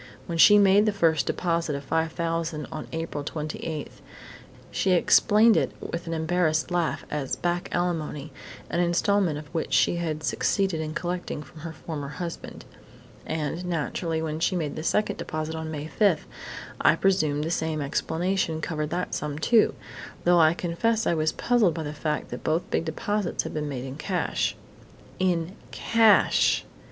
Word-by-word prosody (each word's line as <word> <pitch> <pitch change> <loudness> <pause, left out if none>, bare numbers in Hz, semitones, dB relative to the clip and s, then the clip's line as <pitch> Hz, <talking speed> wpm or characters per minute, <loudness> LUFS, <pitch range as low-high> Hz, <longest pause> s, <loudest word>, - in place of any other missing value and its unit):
When 170 -1 -4
she 210 +5 +9
made 205 +1 +5
the - - +4
first 165 -7 +2
deposit 170 -4 0
of 140 0 -7
$5,000 165 -1 -1
on - - -6
April 160 -3 -4
28, 155 0 -5 0.8
she 190 - +1
explained 210 +5 +5
it - - +1
with 170 0 -5
an 165 - -2
embarrassed 160 0 +1
laugh 175 -2 -1
as 145 -3 -2
'back 175 0 -2
alimony', 160 -4 -2 0.4
an 170 - 0
instalment 175 -1 +2
of 150 - -7
which 165 - -2
she 175 - +3
had 155 -2 -3
succeeded 190 -1 0
in 155 0 -5
collecting 175 -4 -3
from 155 +3 -15
her 165 +1 -6
former 155 -3 -6
husband. 170 +4 -7 0.6
And, 160 +2 -2
naturally, 165 -1 -2
when 155 0 -3
she 180 +3 +1
made 155 -5 -2
the - - -4
second 210 +6 0
deposit 155 0 -4
on 160 0 -4
May 150 -1 -5
5, 175 0 +2 0.6
I - - +5
presumed 155 -7 +1
the 160 - -2
same 160 -2 -1
explanation 160 +4 -1
covered 155 -2 -3
that 180 +2 -3
sum, 150 -1 -3
too, 220 +8 +3 0.5
though 175 0 +5
I 160 0 +5
confess 215 +7 0
I - - +2
was 155 -1 +1
puzzled 230 -8 +2
by 160 - -3
the 150 0 -5
fact 150 -1 -2
that 125 - -6
both 160 +3 0
big - - 0
deposits 200 +4 -1
had - - -6
been 150 -1 -2
made 130 -2 -4
in 135 +1 -7
cash." 180 +3 -1 0.6
_In 175 -2 +1 0.2
cash! 225 -2 +4
165 Hz, 165 wpm, -26 LUFS, 155-180 Hz, 0.8 s, she